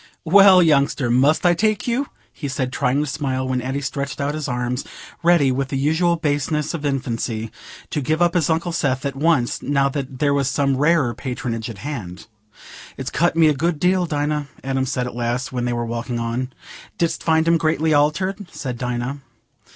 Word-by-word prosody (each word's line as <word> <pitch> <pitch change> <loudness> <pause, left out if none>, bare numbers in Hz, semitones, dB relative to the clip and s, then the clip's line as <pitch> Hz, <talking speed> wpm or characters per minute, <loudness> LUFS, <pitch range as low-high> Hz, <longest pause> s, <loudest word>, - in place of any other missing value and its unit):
"Well, 190 +1 +7
youngster, 140 -5 +2
must 140 +8 +3
I 175 - +6
take 215 +5 0
you?" 255 +4 0 0.3
he 145 - -5
said, 130 -1 -3
trying 130 +4 +1
to - - 0
smile, 135 -2 -2
when 130 -1 -1
Addy 135 +3 -3
stretched 140 0 -4
out 140 +1 -1
his 155 -1 -4
arms—ready, 130 +5 0
with 135 +1 -1
the 135 -1 -3
usual 160 +5 +2
baseness 150 -1 -1
of 165 -3 -5
infancy, 115 -4 -2 0.4
to 150 - -1
give 155 +4 0
up 175 -1 +3
his 170 -4 +1
Uncle 165 +2 0
Seth 140 -5 -1
at 140 -1 -2
once, 145 -4 +1
now 140 0 +1
there 140 0 -1
was 140 -1 +1
some 140 -1 +1
rarer 145 -4 +3
patronage 125 -2 -4
at 115 - -8
hand. 100 -12 -6 0.7
"It's - - -4
cut 175 +2 +1
me 165 -1 +5
a 150 - +4
good 160 +2 -1
deal, 180 +1 +2
Dinah," 150 -1 -1 0.2
Adam 135 0 -1
said 125 -2 -1
at 125 - -6
last, 120 +2 -2
when 125 -1 -2
they 120 - -1
were 120 0 -2
walking 120 +1 -3
on. 120 +3 -2 0.5
"Didst 170 -1 0
find 160 0 +2
him 165 0 +4
greatly 155 0 +1
altered?" 180 +7 +1
said 125 -4 -5
Dinah. 125 +2 -3
140 Hz, 190 wpm, -21 LUFS, 125-160 Hz, 0.7 s, Well